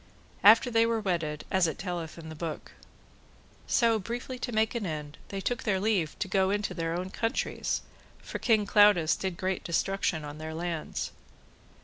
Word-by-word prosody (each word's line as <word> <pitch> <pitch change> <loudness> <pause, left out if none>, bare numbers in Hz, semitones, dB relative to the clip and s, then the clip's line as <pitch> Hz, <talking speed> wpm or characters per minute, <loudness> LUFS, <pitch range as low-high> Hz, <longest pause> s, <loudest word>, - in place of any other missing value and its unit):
After 225 +4 +7
they 230 0 +4
were 230 -1 +1
wedded, 165 -7 -2
as 190 -2 +4
it 160 - -3
telleth 175 -4 -5
in 160 -1 -9
the - - -6
book. 160 0 -6 1.0
So, 230 -2 +3
briefly 245 +5 -5
to 245 - -3
make 220 -1 +1
an 230 -5 -2
end, 150 -2 -6
they 195 - -5
took 240 +5 -2
their 195 -3 +1
leave 195 -6 0
to 190 - -2
go 190 0 +2
into 205 +1 -1
their 165 -1 -2
own 185 +2 -4
countries, 225 +2 -1 0.3
for - - -7
King 220 -3 +3
Claudas 205 -6 +5
did 190 -3 -3
great 185 0 -2
destruction 170 -2 0
on 145 +1 -8
their 160 0 -5
lands. 170 -1 -3
190 Hz, 175 wpm, -29 LUFS, 165-220 Hz, 1.0 s, After